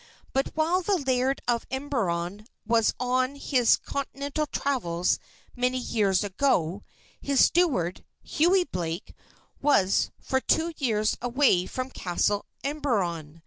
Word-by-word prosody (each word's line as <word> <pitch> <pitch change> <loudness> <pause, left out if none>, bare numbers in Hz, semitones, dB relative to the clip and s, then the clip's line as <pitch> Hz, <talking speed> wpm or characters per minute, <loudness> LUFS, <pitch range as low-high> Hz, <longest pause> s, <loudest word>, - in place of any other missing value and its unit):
But 270 +1 +1
while 330 +4 +2
the 390 +2 +1
Laird 265 -2 0
of 235 -1 0
Emberon 210 -8 -2 0.2
was 225 0 +2
on 255 +2 0
his 255 -4 +3
Continental 280 +2 -3
travels 180 -13 0 0.4
many 250 +1 0
years 210 -6 +1
ago, 195 - 0 0.4
his 280 -2 +4
steward, 255 - +1 0.2
Hughie 360 +4 +3
Blake, 175 - -5 0.5
was 200 -10 +3
for 265 - 0
two 330 +4 +1
years 215 -6 +1
away 245 -7 +2
from 255 0 -4
Castle 200 +2 -1 0.2
Emberon. 190 - -2
250 Hz, 115 wpm, -27 LUFS, 195-280 Hz, 0.5 s, his